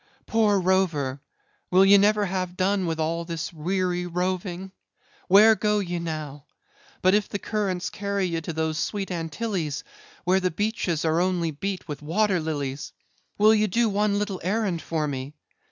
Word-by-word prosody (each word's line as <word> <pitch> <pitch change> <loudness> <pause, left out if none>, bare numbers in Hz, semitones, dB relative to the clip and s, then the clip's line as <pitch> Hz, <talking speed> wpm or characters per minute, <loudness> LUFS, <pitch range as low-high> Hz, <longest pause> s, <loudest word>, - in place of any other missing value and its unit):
"Poor 215 -3 +3
rover! 170 -8 +1 0.5
will 185 +2 +5
ye 200 +1 +7
never 205 +1 +4
have 185 -1 -3
done 190 0 +1
with 165 -1 -2
all 165 +2 -1
this 165 -1 -5
weary 180 +2 -1
roving? 180 +1 -3 0.6
where 210 +4 +7
go 210 +1 +1
ye 175 -4 -2
now? 155 -4 -5 0.6
But 185 +1 +5
if 210 -1 +2
the - - -2
currents 195 -4 -2
carry 200 -1 -2
ye 165 -2 -2
to 165 - -5
those 160 -1 -1
sweet 195 +1 -2
Antilles 165 -2 -3 0.4
where 185 +1 +3
the 185 -1 +1
beaches 180 -4 -1
are 160 +1 +2
only 180 -3 0
beat 190 +5 -4
with 150 -2 -6
water 185 +5 +1
lilies, 145 -3 -4 0.4
will 215 +1 +6
ye 215 -1 +3
do 230 +4 +2
one 205 0 +1
little 205 -2 -2
errand 190 -3 0
for 155 0 -2
me? 135 +1 -5
185 Hz, 165 wpm, -25 LUFS, 160-200 Hz, 0.6 s, ye